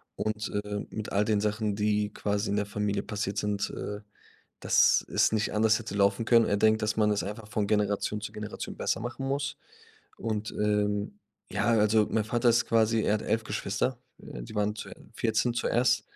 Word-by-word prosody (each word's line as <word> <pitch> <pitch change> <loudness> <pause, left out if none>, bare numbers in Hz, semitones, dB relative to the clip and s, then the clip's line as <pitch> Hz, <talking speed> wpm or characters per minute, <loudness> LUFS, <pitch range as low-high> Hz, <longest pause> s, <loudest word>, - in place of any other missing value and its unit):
und, 110 0 -2
äh, 105 0 -4
mit 110 0 -6
all 100 +2 +2
den 105 -1 +1
Sachen, 105 -1 -1
die 105 0 +1
quasi 105 0 -1
in 100 - +1
der 105 - 0
Familie 100 0 -1
passiert 105 -1 -3
sind, 100 -1 -1
äh 105 0 -5 0.6
dass - - +4
es - - +3
nicht 110 0 0
anders 110 +1 +3
hätte 105 -3 -6
laufen 100 +3 +2
können. 115 0 +5
Er 100 - +1
denkt, 110 +1 +3
dass 105 0 0
man 105 -1 +3
es 100 -4 0
einfach 105 +2 -6
von 105 -1 0
Generation 105 0 0
zu 105 - -5
Generation 105 -1 -6
besser - - 0
machen 120 +3 -4
muss. 145 +2 -2 0.6
Und, 110 -1 -3
ähm, 105 - 0 0.3
ja, 105 +1 0
also, 105 -1 +4
mein 110 - +1
Vater 120 +2 +2
ist 115 0 +3
quasi 115 0 +3
er 105 - +2
hat 105 - -3
11 110 0 0
Geschwister, 110 +5 -2 0.3
äh, - - -8
die - - -10
waren 105 0 0
zu - - -7 0.3
14 115 +1 +1
zuerst. 120 +1 +2
105 Hz, 195 wpm, -28 LUFS, 105-110 Hz, 0.6 s, können